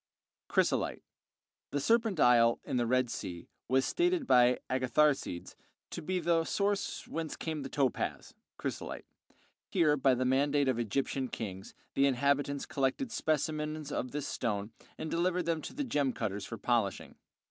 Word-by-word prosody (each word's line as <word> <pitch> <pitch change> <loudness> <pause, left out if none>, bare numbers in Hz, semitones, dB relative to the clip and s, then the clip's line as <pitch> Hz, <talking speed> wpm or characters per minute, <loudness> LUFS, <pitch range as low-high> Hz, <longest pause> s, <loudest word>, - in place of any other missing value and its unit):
Chrysolite - - +1 0.7
The 145 - -1
"Serpent 225 - +2
Isle," 120 -2 +5
in - - -2
the 120 -1 +1
Red 130 0 +2
Sea, 85 -1 -6 0.2
was 130 +2 +3
stated 350 -3 +1
by 125 - +5
Agatharcides 130 -6 +1 0.4
to - - -5
be 185 +3 -1
the 165 -1 +2
source 200 +3 -1
whence 160 -1 -4
came 160 -2 -4
the 135 - -5
topaz 135 -3 -1 0.2
(chrysolite); - - -5 0.6
here, 150 -3 +3
by 135 -2 +3
the 130 +1 0
mandate 140 +2 +2
of 130 -3 +2
the - - 0
Egyptian 130 +3 -1
kings, 95 -5 -6 0.2
the 140 0 +4
inhabitants 140 +1 +1
collected 140 - -1
specimens 155 -3 -1
of 130 - -2
this 145 +2 -4
stone 105 -2 -2 0.3
and 160 - -5
delivered 180 +1 +1
them 165 -2 0
to - - -7
the 295 - -1
gem 145 - 0
cutters 100 -3 -3
for - - -6
polishing. - - 0
140 Hz, 155 wpm, -32 LUFS, 125-160 Hz, 0.7 s, Isle